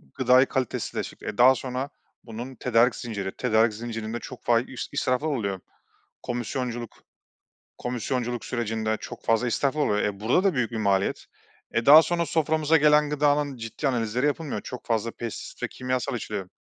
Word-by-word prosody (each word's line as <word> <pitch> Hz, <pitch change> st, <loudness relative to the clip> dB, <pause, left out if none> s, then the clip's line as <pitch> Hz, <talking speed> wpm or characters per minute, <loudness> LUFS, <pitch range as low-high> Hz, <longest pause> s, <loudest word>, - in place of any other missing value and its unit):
gıdayı 130 Hz, +1 st, +5 dB
kalitesizleştirdik. 130 Hz, -2 st, -3 dB
E, -, -, -4 dB
daha 130 Hz, +2 st, +7 dB
sonra 130 Hz, +2 st, -4 dB, 0.3 s
bunun 120 Hz, +3 st, -7 dB
tedarik 120 Hz, 0 st, +3 dB
zinciri 100 Hz, -5 st, -4 dB
tedarik 110 Hz, -2 st, +3 dB
zincirinde 115 Hz, 0 st, -5 dB
çok 130 Hz, +1 st, -10 dB
fa 115 Hz, -1 st, +4 dB
i 125 Hz, -, -5 dB, 0.3 s
israflar 130 Hz, +4 st, 0 dB
oluyor. 100 Hz, -10 st, -2 dB, 0.6 s
Komisyonculuk 120 Hz, -1 st, -3 dB, 0.9 s
komisyonculuk 120 Hz, 0 st, -2 dB
sürecinde 110 Hz, -2 st, -1 dB
çok 120 Hz, -, -9 dB
fazla 115 Hz, +2 st, +2 dB
israflar 140 Hz, +5 st, 0 dB
oluyor. 105 Hz, -6 st, +1 dB
E, 100 Hz, -1 st, -2 dB
burada 125 Hz, -, +2 dB
da 195 Hz, -, +3 dB
büyük 125 Hz, -4 st, 0 dB
bir 115 Hz, -, -5 dB
maliyet. 100 Hz, -3 st, 0 dB, 0.5 s
E, 115 Hz, +2 st, 0 dB
daha 155 Hz, +3 st, +10 dB
sonra 170 Hz, 0 st, 0 dB
soframıza 160 Hz, 0 st, +2 dB
gelen 150 Hz, 0 st, +4 dB
gıdanın 145 Hz, -1 st, +1 dB
ciddi 115 Hz, +5 st, -3 dB
analizleri 120 Hz, +1 st, 0 dB
yapılmıyor. 150 Hz, 0 st, -2 dB
Çok 125 Hz, -, -8 dB
fazla 115 Hz, 0 st, 0 dB
pestisit 115 Hz, -1 st, -7 dB
ve -, -, 0 dB
kimyasal 130 Hz, +1 st, -2 dB
içeriyor. 105 Hz, -5 st, -5 dB
120 Hz, 155 wpm, -26 LUFS, 115-135 Hz, 0.9 s, daha